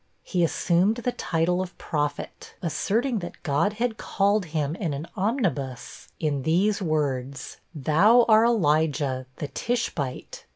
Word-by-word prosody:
He 180 -2 0
assumed 175 +5 +2
the 240 +1 -2
title 175 -2 0
of 185 -1 -7
Prophet, 145 -2 -4
asserting 220 - 0
that 175 - -9
God 165 +6 +1
had 225 0 -2
called 200 0 +1
him 155 -1 -2
in 165 -8 -2
an 145 +3 -5
omnibus, 180 - -2
in 145 -3 0
these 190 +8 +2
words: 140 -5 -2 0.2
'Thou 195 - +5
are 220 0 +6
Elijah, 150 - +1
the 145 - -5
Tishbite. 150 - -3
165 Hz, 130 wpm, -25 LUFS, 145-210 Hz, 0.2 s, are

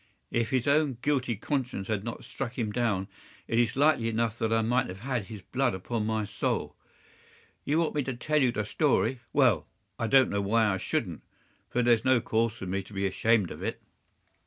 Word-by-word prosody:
If 115 -2 0
his 130 +1 0
own 140 -3 +3
guilty 130 -5 +1
conscience 125 -4 -3
had 105 -3 -1
not 115 - -6
struck 125 -2 -6
him 110 -4 -1
down 105 -5 0 0.4
it 115 - +1
is 120 -2 +2
likely 140 -5 +3
enough 115 0 -1
that 110 - 0
I 115 0 +3
might 120 +3 +1
have 95 +1 -8
had 125 -4 -2
his 105 -2 -9
blood 130 -4 0
upon 105 +3 -3
my 110 -1 0
soul. 100 0 -2 0.9
You 150 - +1
want 165 -1 +1
me 150 - +1
to 130 - -3
tell 140 0 +2
the 105 -3 -2
story. 130 -1 +1
Well, - - +3 0.3
I 115 - 0
don't 135 +2 +5
know 100 - 0
why 110 +3 +2
I - - -1
shouldn't, - - -2 0.5
for 125 - +1
there's 115 -2 +4
no 130 -1 +4
cause 115 -1 0
for 110 - -8
me 95 +2 -2
to 95 +2 -14
be 100 0 -1
ashamed 105 0 +2
of - - -8
it. - - -3
115 Hz, 205 wpm, -28 LUFS, 105-130 Hz, 0.9 s, don't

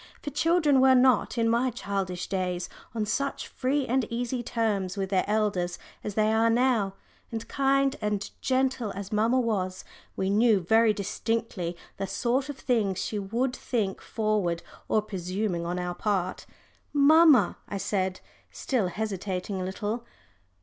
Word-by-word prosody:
For 290 - -6
children 300 -2 +3
were 260 0 +6
not, 250 -2 +3
in 230 -1 +2
my 235 +3 +2
childish 195 -6 -3
days, 180 -2 -2 0.3
on 220 -2 0
such 275 +7 -2
free 275 +2 -1
and 255 -2 +1
easy 245 +1 -2
terms 210 -5 -1
with 195 0 -2
their 190 -2 +3
elders 205 -5 0 0.3
as 210 - -4
they 215 0 +3
are 225 +1 +4
now. 230 -5 +2 0.4
And 225 -1 -5
kind 275 0 +2
and 210 -1 -1
gentle 260 -4 0
as 200 0 -6
mamma 225 +4 +3
was, 190 -6 -1 0.3
we 190 0 0
knew 215 0 +4
very 220 +5 +4
distinctly 205 -3 -2 0.2
the 195 - -3
sort 255 +7 0
of 285 - -5
things 215 -9 0
she 210 - -2
would 235 +6 -1
think 210 -8 -2
forward 210 -6 -1 0.2
or 215 - +2
presuming 185 -2 -3
on 175 +1 -2
our 180 0 -2
part. 185 -1 -2 0.5
"Mamma," 290 - +6
I 200 - -3
said, 190 -1 -1 0.3
still 240 -8 -1
hesitating 190 -1 -3
a - - -2
little. 210 +5 -3
215 Hz, 150 wpm, -27 LUFS, 190-245 Hz, 0.5 s, were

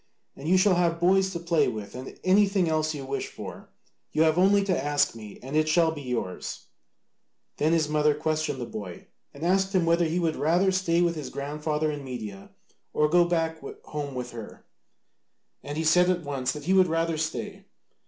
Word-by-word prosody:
And 145 +4 -5
you 185 - +5
shall 190 +1 +4
have 170 -1 +1
boys 190 +2 +3
to 175 -3 -5
play 170 -1 +2
with 110 -4 -5
and 130 +1 -8
anything 195 -1 +3
else 155 -1 0
you 140 -2 -6
wish 135 +1 -3
for: - - -9 0.4
you 155 - +3
have 160 -1 +3
only 195 +3 +4
to 185 -8 0
ask 145 0 +1
me 110 -3 -10
and 135 +3 -5
it 155 0 +2
shall 165 0 +4
be 155 -2 -7
yours." 125 -8 -4 0.9
Then 155 +2 +2
his 165 -2 +2
mother 150 -1 +2
questioned 155 -2 -1
the 120 - -3
boy 100 -6 -8 0.3
and 140 - -10
asked 190 +2 +1
him 180 -2 +3
whether 170 +1 +3
he 165 +2 -1
would 165 -3 0
rather 175 +7 +2
stay 175 -2 +2
with 170 -1 +2
his 150 -5 -6
grandfather 150 +2 -2
in 145 -1 -6
Media, 110 -7 -7 0.4
or 150 0 +2
go 175 +2 +5
back 165 -2 -1 0.2
home 145 -3 -5
with 125 -1 -5
her: 115 -3 -10 1.0
and 145 +1 -6
he 160 - 0
said 180 +3 +4
at 180 -2 0
once 135 -3 -2
that 150 -1 -8
he 185 +5 +1
would 190 -1 +5
rather 165 0 0
stay. 195 +6 -4
160 Hz, 200 wpm, -26 LUFS, 145-175 Hz, 1.0 s, you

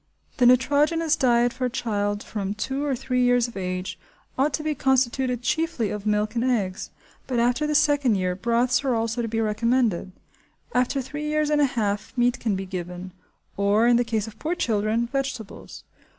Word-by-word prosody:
The 245 - +5
nitrogenous 295 +5 +3
diet 240 -2 +2
for 255 0 -2
a - - 0
child 205 -4 -2
from 200 -1 -4
two 265 +6 -3
or 285 -2 0
three 250 +1 -1
years 245 -1 +3
of 240 - -12
age 185 -1 -4 0.4
ought 280 +3 +2
to 305 - -5
be 310 0 0
constituted 260 -2 +1
chiefly 315 - -1
of 210 0 -5
milk 210 0 +1
and 235 -1 0
eggs, 210 -7 -1 0.4
but 255 - -1
after 245 +6 +1
the 300 - -1
second 290 -6 +3
year 185 -1 0
broths 235 +6 +1
are 260 -3 +1
also 225 +1 -1
to 230 - -2
be 225 0 -2
recommended. 220 -3 0 0.6
After 255 +2 +1
three 295 +3 -6
years 305 0 0
and 295 0 +3
a - - +5
half 210 +2 -2
meat 245 +1 +2
can 220 -4 0
be 190 0 -4
given; 180 0 -6 0.5
or, 200 +3 +3
in 240 0 +5
the 245 - +2
case 225 -3 -1
of 225 -1 -12
poor 325 +3 -1
children, 220 -4 0
vegetables. 265 -4 -5
240 Hz, 190 wpm, -24 LUFS, 210-265 Hz, 0.6 s, The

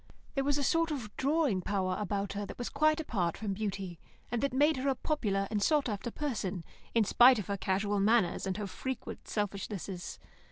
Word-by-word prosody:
There 275 - 0
was 285 +1 +2
a 285 - 0
sort 330 +4 +2
of 280 -7 -3
a - - -10
drawing 280 - +2
power 185 -1 0
about 200 0 -2
her 205 +1 -3
that - - -8
was 245 - -3
quite 310 +2 +3
apart 190 - -1
from 205 -2 -2
beauty, 195 -4 -4 0.3
and 240 - 0
that 280 0 +1
made 290 +4 +3
her 270 +2 0
a 270 - +2
popular 205 -10 0
and 210 -2 0
sought 295 +5 +3
after 210 +1 -3
person, 215 - -3 0.3
in 230 - +5
spite 245 +5 +7
of 210 - -3
her 200 - -2
casual 200 +1 0
manners 205 -2 +3
and 190 - -1
her 210 - -3
frequent 260 +7 -5
selfishnesses. 200 -3 -4
210 Hz, 205 wpm, -31 LUFS, 195-270 Hz, 0.3 s, spite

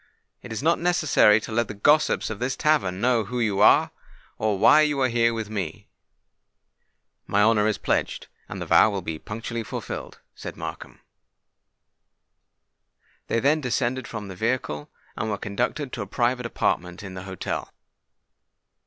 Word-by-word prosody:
It 125 - -10
is 110 +3 -4
not 165 +2 +3
necessary 155 - +4
to - - -8
let 115 0 +1
the 105 - -7
gossips 150 +4 +2
of 110 - -6
this 125 +2 -1
tavern 130 -13 +1
know 120 -3 +2
who 125 +4 -4
you 105 -4 0
are, - - +5 0.5
or 110 -2 0
why 155 +10 +6
you 150 -2 +1
are 130 - +4
here 115 0 +2
with 115 -2 -4
me." 100 -7 -5 1.4
"My 105 +1 +3
honour 110 -1 +4
is 110 - 0
pledged, - - -1 0.2
and - - -6
the - - -4
vow - - +5
will 100 -3 -4
be 80 -2 -5
punctually 115 +2 -5
fulfilled," 110 - -6
said - - -8
Markham. - - -8 2.3
They 115 - +1
then 145 +6 +2
descended 125 -1 -1
from 105 -3 -6
the 95 - -8
vehicle, 110 -9 -2 0.3
and 110 - -3
were 105 - -1
conducted 125 +7 -3
to 115 - -4
a 100 - -5
private 125 +3 0
apartment 90 -4 -2
in 95 -2 -8
the 95 - -7
hotel. 95 -1 -5
115 Hz, 160 wpm, -24 LUFS, 100-125 Hz, 2.3 s, why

